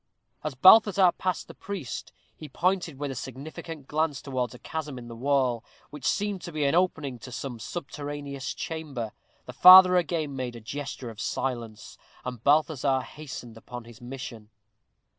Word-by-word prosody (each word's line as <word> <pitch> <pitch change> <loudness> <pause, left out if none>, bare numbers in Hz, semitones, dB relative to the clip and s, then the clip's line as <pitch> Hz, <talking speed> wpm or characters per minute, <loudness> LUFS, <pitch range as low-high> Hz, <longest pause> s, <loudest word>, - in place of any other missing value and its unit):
As 155 -3 -3
Balthazar 190 - +7
passed 185 -2 -2
the - - -10
priest, 190 - -6 0.2
he 155 - -10
pointed 180 -5 0
with 145 0 -3
a - - -6
significant 140 +3 -8
glance 150 -2 0
towards 130 -3 -3
a - - -10
chasm 150 0 -5
in 120 -1 -9
the 115 - -8
wall, 130 -2 +1 0.3
which 150 -3 -9
seemed 205 -2 0
to 175 - -7
be 155 -2 -2
an 140 - +2
opening 160 -8 0
to 125 - -10
some 125 -1 -5
subterraneous 145 -1 -5
chamber. 155 - -5 0.3
The - - -8
father 185 0 +10
again 160 -4 -1
made 125 -2 -4
a - - -7
gesture 130 +1 -6
of 110 - -9
silence, 120 -5 -4 0.3
and 125 -2 -6
Balthazar 145 -3 +3
hastened 130 -5 -9
upon 120 +1 -9
his 115 0 -14
mission. 120 -4 -8
140 Hz, 160 wpm, -27 LUFS, 125-160 Hz, 0.3 s, father